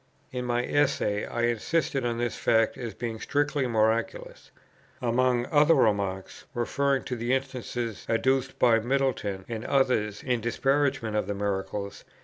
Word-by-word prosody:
In 125 -1 -4
my 120 0 0
Essay 140 -8 +1
I 120 - -2
insisted 130 +4 0
on 120 -1 -1
this 120 -1 -1
fact 115 -1 +2
as 120 -2 -6
being 115 -2 -4
strictly 145 +1 0
miraculous. 110 0 -1 0.5
Among 125 0 +1
other 150 +1 +5
remarks 100 -6 0
(referring 135 +3 0
to 125 - -4
the 120 +2 -1
instances 125 -4 -4
adduced 130 +3 +1
by 115 -2 +4
Middleton 120 -6 -1
and 115 -1 -5
others 125 -7 +1
in 125 -3 0
disparagement 135 -1 0
of 105 - 0
the 100 - -2
miracle, 100 0 -2
viz. - - -15
120 Hz, 145 wpm, -27 LUFS, 110-135 Hz, 0.5 s, other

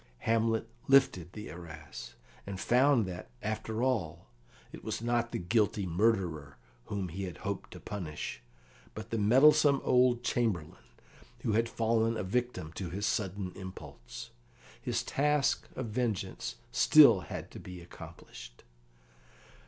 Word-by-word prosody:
Hamlet 115 0 +1 0.2
lifted 135 -11 +4
the 105 0 -7
arras, 75 -8 -9 0.3
and 100 -1 -5
found 125 +4 +4
that, 90 -1 -7
after 110 +1 -2
all, 110 -12 -1 0.5
it - - -10
was - - -3
not 120 0 0
the - - -2
guilty 100 +2 +1
murderer 85 - 0 0.3
whom 100 -3 -3
he 95 +4 -4
had 90 - -7
hoped 100 -1 -3
to - - -10
punish, 90 -7 -5 0.5
but 110 +1 -8
the 115 - 0
meddlesome 140 +6 +6
old 125 -1 +3
Chamberlain, 105 -12 -1 0.6
who - - +1
had 115 +2 +2
fallen 115 0 +1
a - - -2
victim 120 -5 -2
to 90 0 -5
his 100 +4 -3
sudden 100 -3 -1
impulse. 95 -10 -9 0.5
His - - -1
task 145 0 +1
of 130 -4 -4
vengeance 110 -3 -2
had - - -19
still - - +7 0.3
to - - -9
be 90 -1 -9
accomplished. - - -12
105 Hz, 135 wpm, -31 LUFS, 90-120 Hz, 0.6 s, still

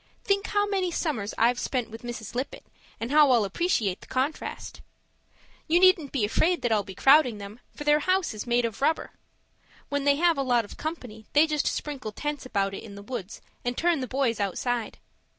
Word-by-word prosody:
Think 400 +1 +1
how 410 0 +1
many 390 -3 0
summers 290 - -2
I've 240 +2 +3
spent 250 -4 -2
with 225 0 -9
Mrs. 240 -3 -7
Lippett 255 +3 -4 0.3
and 230 +3 -4
how 300 -1 +6
I'll 235 -5 +4
appreciate 200 - 0
the - - -14
contrast. 265 +4 -3 0.9
You 335 +2 +4
needn't 365 -6 +4
be 245 -7 +1
afraid 335 +11 +1
that 240 - +1
I'll 215 -2 +3
be 195 -1 -10
crowding 270 -2 +5
them, 205 +3 -9 0.2
for 295 - -6
their 295 0 +4
house 370 0 +1
is 215 +2 -6
made 240 0 +2
of 225 0 -5
rubber. 315 +3 +1 0.8
When 285 -1 -1
they 285 0 +4
have 335 -1 +2
a - - +2
lot 245 -4 +2
of - - -11
company, 245 -9 -6
they 295 +2 +6
just 305 -2 -1
sprinkle 270 -7 -3
tents 295 +2 -4
about 195 -4 0
in 200 +1 -8
the 200 - -10
woods 220 -3 -6 0.2
and 245 0 -2
turn 340 -2 +2
the 255 - -3
boys 255 -3 0
outside. 225 +4 -2
255 Hz, 200 wpm, -27 LUFS, 220-305 Hz, 0.9 s, how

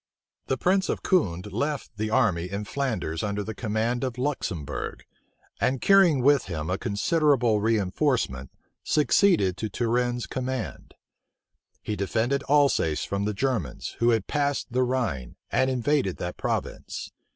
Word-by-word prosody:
The 130 - 0
prince 190 +6 +2
of - - -2
Condé 100 - +1
left 145 -1 -2
the 110 +1 -1
army 95 -8 +2
in 100 +2 -4
Flanders 110 - -2
under 105 0 -2
the 110 - -5
command 115 +3 -1
of 125 -2 -3
Luxembourg; 90 - -3 0.6
and 130 0 +1
carrying 175 -9 +5
with 145 0 +4
him 80 -2 -4
a 95 - -1
considerable 120 0 +2
reënforcement, 105 - 0 0.3
succeeded 150 - +3
to 110 - -3
Turenne's 120 +3 0
command. 130 -4 -5 0.9
He 105 - -2
defended 115 +7 0
Alsace 140 - +3
from 100 0 -2
the 105 0 -2
Germans, 125 - -2
who 120 - +4
had 115 -4 +2
passed 145 -3 -1
the 130 - +2
Rhine, 120 - -1 0.2
and 130 0 +2
invaded 130 -5 0
that 90 0 -4
province. - - -4
120 Hz, 140 wpm, -26 LUFS, 100-135 Hz, 0.9 s, carrying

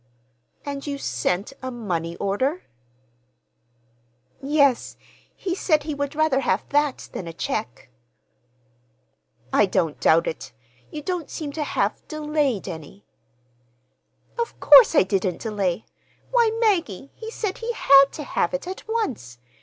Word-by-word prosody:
"And 280 0 -5
you 285 -1 -3
sent—a 260 +2 -2
money 175 -9 -3
order?" 260 - -1 1.8
"Yes. 280 -2 +2 0.4
He 370 -3 -3
said 310 -5 +1
he 305 0 -3
would 285 +1 -3
rather 310 -3 +2
have 225 -7 0
that 290 -1 0
than 175 - -5
a 165 - -6
check." 125 -6 -4 1.7
"I 210 - +5
don't 175 -5 0
doubt 165 +1 +4
it! - - -5 0.4
You 300 - -7
don't 355 -2 -3
seem 300 -3 -5
to 300 +1 -3
have—delayed 300 - -1
any." 165 +3 -9 1.3
"Of 470 - -3
course 475 -9 +8
I - - +6
didn't 185 -2 -1
delay! 205 -3 -1 0.5
Why, 475 -2 +4
Maggie, 335 - 0
he 445 - -8
said 420 -4 -4
he 465 +1 -2
had 275 -9 +7
to 305 - -6
have 275 - -1
it 270 - -5
at 375 +4 -7
once. 260 - -3
275 Hz, 130 wpm, -23 LUFS, 195-310 Hz, 1.8 s, course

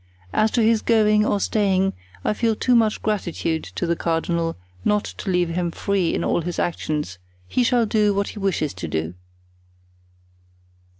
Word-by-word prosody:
As 215 - +3
to 230 - +4
his 220 0 +3
going 215 -2 +4
or 205 -1 +1
staying, 195 -2 +1 0.3
I - - +2
feel 225 0 +1
too 250 - +1
much 225 -3 +3
gratitude 170 -6 -1
to - - -1
the 170 0 +1
cardinal 165 0 -1 0.3
not 210 0 +2
to - - -6
leave 180 -2 +2
him 175 +1 -1
free 190 0 0
in - - -1
all - - +1
his 175 +1 -4
actions; 150 - -2 0.3
he 250 - +1
shall 240 -1 +3
do 210 -1 +2
what 200 0 0
he 210 - -8
wishes 185 -7 0
to 90 -2 -6
do." 80 +2 -2
195 Hz, 170 wpm, -22 LUFS, 165-215 Hz, 0.3 s, to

